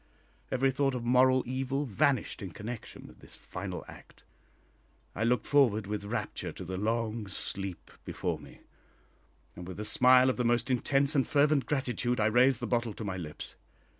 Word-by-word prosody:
Every 135 Hz, +1 st, +2 dB
thought 135 Hz, 0 st, 0 dB
of 120 Hz, -, -4 dB
moral 130 Hz, +1 st, +4 dB
evil 135 Hz, +3 st, -2 dB
vanished 130 Hz, +2 st, 0 dB
in 95 Hz, -, -5 dB
connection 115 Hz, +6 st, -8 dB
with -, -, -15 dB
this -, -, -11 dB
final -, -, -7 dB
act. -, -, -15 dB, 0.9 s
I 105 Hz, -, -2 dB
looked 120 Hz, +2 st, +1 dB
forward 120 Hz, -8 st, +3 dB
with 105 Hz, 0 st, -4 dB
rapture 100 Hz, -, -4 dB
to 95 Hz, -, -8 dB
the 95 Hz, +2 st, -5 dB
long 110 Hz, +1 st, -2 dB
sleep 95 Hz, -1 st, -5 dB
before -, -, -3 dB
me, -, -, -15 dB, 0.9 s
and 90 Hz, 0 st, -9 dB
with 95 Hz, +2 st, -8 dB
a 105 Hz, -, -3 dB
smile 130 Hz, +3 st, +6 dB
of -, -, -7 dB
the 125 Hz, -, 0 dB
most 120 Hz, +2 st, +1 dB
intense 135 Hz, +3 st, +3 dB
and 135 Hz, -3 st, +2 dB
fervent 145 Hz, -1 st, +2 dB
gratitude 125 Hz, -4 st, -1 dB
I 110 Hz, -, +2 dB
raised 120 Hz, +3 st, +4 dB
the -, -, -2 dB
bottle 120 Hz, -2 st, -1 dB
to -, -, -6 dB
my 95 Hz, -2 st, -3 dB
lips. 75 Hz, -4 st, -8 dB
120 Hz, 175 wpm, -30 LUFS, 105-130 Hz, 0.9 s, smile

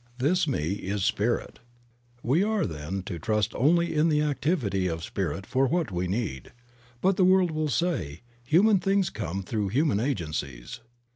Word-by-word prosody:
This 160 Hz, +7 st, +1 dB
Me 85 Hz, -, -1 dB
is 100 Hz, 0 st, -2 dB
Spirit. 115 Hz, +4 st, -1 dB, 0.6 s
We 140 Hz, +9 st, +2 dB
are, 215 Hz, 0 st, +1 dB
then, 80 Hz, +3 st, -5 dB
to 90 Hz, -3 st, -6 dB
trust 105 Hz, +4 st, 0 dB
only 170 Hz, +6 st, +2 dB
in 155 Hz, +2 st, +3 dB
the 150 Hz, -1 st, +2 dB
activity 140 Hz, -, 0 dB
of 80 Hz, -1 st, -3 dB
Spirit 95 Hz, +1 st, -3 dB
for 135 Hz, +1 st, +1 dB
what 165 Hz, -, 0 dB
we 90 Hz, 0 st, -2 dB
need. 95 Hz, -, -3 dB, 0.5 s
But 190 Hz, 0 st, +2 dB
the 190 Hz, -, +4 dB
world 185 Hz, -1 st, +4 dB
will 155 Hz, -1 st, -1 dB
say, 110 Hz, -, -1 dB, 0.2 s
"Human 190 Hz, -, +4 dB
things 195 Hz, -1 st, +1 dB
come 100 Hz, -3 st, -4 dB
through 105 Hz, +1 st, -2 dB
human 130 Hz, +1 st, +1 dB
agencies." 75 Hz, -, -3 dB
120 Hz, 160 wpm, -27 LUFS, -, 0.6 s, the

